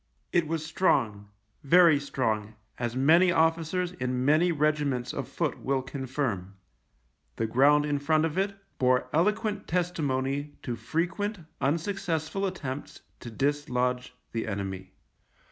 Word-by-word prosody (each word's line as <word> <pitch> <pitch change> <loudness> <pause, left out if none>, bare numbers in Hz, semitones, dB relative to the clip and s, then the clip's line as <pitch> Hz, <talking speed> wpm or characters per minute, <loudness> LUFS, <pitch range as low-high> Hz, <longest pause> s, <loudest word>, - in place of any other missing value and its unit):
It 170 -3 +3
was 160 0 -2
strong, 115 - +1 0.3
very 165 0 +6
strong, 110 -6 -2 0.2
as 120 -1 -2
many 165 +7 +5
officers 165 +2 +1
in 125 -7 -2
many 155 +5 +4
regiments 145 -5 0
of - - -4
foot - - -2
will 135 -1 -1
confirm. 130 -8 -3 0.8
The - - -1
ground 140 +6 +4
in 145 -1 0
front 155 +2 +2
of 160 -1 -3
it 195 +1 0 0.2
bore 130 -1 +2
eloquent 210 +4 +1
testimony 145 -5 -1
to 120 - -3
frequent 190 - -2 0.2
unsuccessful 170 +3 -1
attempts 145 -7 -6 0.2
to 120 - -8
dislodge 125 -1 -1 0.2
the 115 0 -3
enemy. 95 -2 -5
145 Hz, 125 wpm, -28 LUFS, 125-170 Hz, 0.8 s, very